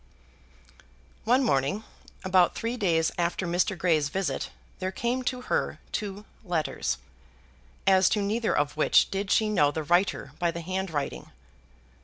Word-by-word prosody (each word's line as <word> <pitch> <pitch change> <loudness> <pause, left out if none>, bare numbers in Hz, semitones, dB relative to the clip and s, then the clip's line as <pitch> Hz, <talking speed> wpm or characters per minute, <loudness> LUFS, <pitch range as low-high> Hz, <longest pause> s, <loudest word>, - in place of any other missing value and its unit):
One 250 +4 +4
morning, 145 - +1 0.4
about 185 -2 +3
three 230 +1 -2
days 170 -8 +1
after 175 +2 0
Mr. 175 +3 0
Grey's 160 -4 +2
visit, 175 -6 -2 0.3
there 185 0 -2
came 240 +5 -1
to 250 0 -1
her - - -1
two 205 0 -4 0.2
letters, 175 -6 -1 0.9
as 190 -1 +5
to 210 - +1
neither 220 +3 0
of 145 0 0
which 155 - +4
did 195 0 -2
she 220 - +3
know 175 -9 +3
the 155 +2 -3
writer 175 +6 +1
by 175 -2 +2
the 170 +1 -4
handwriting. 165 - -3
185 Hz, 140 wpm, -27 LUFS, 160-210 Hz, 0.9 s, as